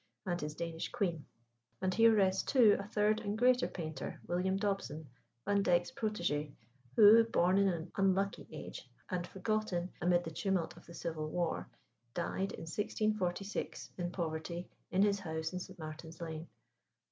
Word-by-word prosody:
and 175 -2 -1
his 150 0 -4
Danish 165 -1 -4
queen. 180 -10 -1 0.5
And 185 -1 0
here 225 +2 +6
rests, 190 -2 +3
too, 235 -7 +5
a 200 - -5
third 210 +1 +2
and 210 -1 -3
greater 250 +2 +4
painter, 155 -5 -5
William 185 +2 0
Dobson, 195 -7 -2 0.4
Vandyke's 195 -3 +2
protégé, 175 - -1 0.4
who, 220 +2 +9
born 185 -3 +3
in 200 - +4
an 170 -2 -2
unlucky 195 0 +1
age, - - -8 0.2
and 175 -1 -1
forgotten 190 -3 -1
amid 175 +1 +3
the 165 - -5
tumult 175 0 -1
of 175 - -16
the 170 - -10
Civil 155 -2 -3
War, 170 +1 -1 0.5
died 190 +3 -1
in - - -7
1646, 205 +1 -2
in 175 -1 -2
poverty, 170 0 -3 0.2
in 190 +2 +3
his 200 -1 +3
house 160 -2 -3
in 180 - -2
St. 185 +1 -9
Martin's 160 0 -8
Lane. 165 -1 -5
180 Hz, 155 wpm, -34 LUFS, 170-205 Hz, 0.5 s, who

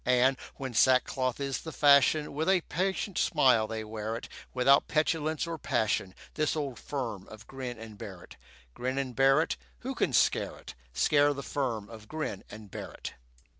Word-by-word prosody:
And, 125 +2 +4 0.2
when 130 -2 -5
sackcloth 130 +1 +3
is 140 -1 -2
the 160 - -7
fashion, 145 +1 +4
With 155 +5 0
a 190 -2 +4
patient 190 +3 -2
smile 115 -5 +4
they 110 0 -4
wear 110 +1 -4
it, 115 - -6 0.2
Without 135 +2 +4
petulance 155 0 0
or 165 -1 -5
passion, 100 -7 0 0.2
This 155 0 0
old 140 -6 -3
firm 115 -9 -4
of 110 0 -12
Grin 130 -2 -6
and 110 -2 -10
Barrett. - - -9 0.4
Grin 130 - -3
and 130 -3 -2
Barrett, 135 +4 +3 0.2
Who 265 +2 -3
can - - 0
scare - - +2
it? - - -10 0.2
Scare 145 - +3
the 140 - -5
firm 120 -7 -2
of 110 -1 -12
Grin 155 -10 -4
and 105 -2 -11
Barrett? - - -7
130 Hz, 170 wpm, -30 LUFS, 115-150 Hz, 0.4 s, And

